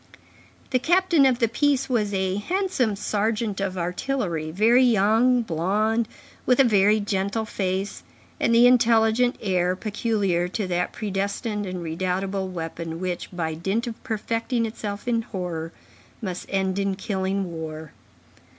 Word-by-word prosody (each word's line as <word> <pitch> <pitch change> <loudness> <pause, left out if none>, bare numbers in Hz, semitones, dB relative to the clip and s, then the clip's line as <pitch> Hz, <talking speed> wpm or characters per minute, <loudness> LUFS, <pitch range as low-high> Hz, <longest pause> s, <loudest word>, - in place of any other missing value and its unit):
The 255 - +3
captain 345 -1 +4
of 255 -2 +2
the 235 -2 +2
piece 275 +3 +1
was 220 -5 0
a 190 -1 0
handsome 305 - 0
sergeant 210 0 -1
of 190 -1 -2
artillery, 175 - -2
very 225 +9 +4
young, 235 +2 +4
blond, 215 +6 0 0.4
with 250 0 +2
a - - +8
very 210 -2 +4
gentle 200 +2 -1
face, 190 -1 -3 0.4
and - - +2
the 235 +1 +7
intelligent 235 0 +4
air 185 -3 +1
peculiar 205 -4 0
to 205 +3 -3
that 180 -1 -1
predestined 205 +1 -3
and 180 -1 -5
redoubtable 190 +3 -2
weapon 165 -2 -5
which, 180 -1 -3
by 165 -3 -2
dint 195 +9 -1
of 235 -2 -7
perfecting 230 +1 -1
itself 210 -1 -5
in 230 -2 +2
horror, 175 -6 -5 0.5
must 185 -4 -5
end 190 0 0
in 195 -1 0
killing 190 -2 -2
war. 160 -2 -7
205 Hz, 140 wpm, -24 LUFS, 185-230 Hz, 0.5 s, a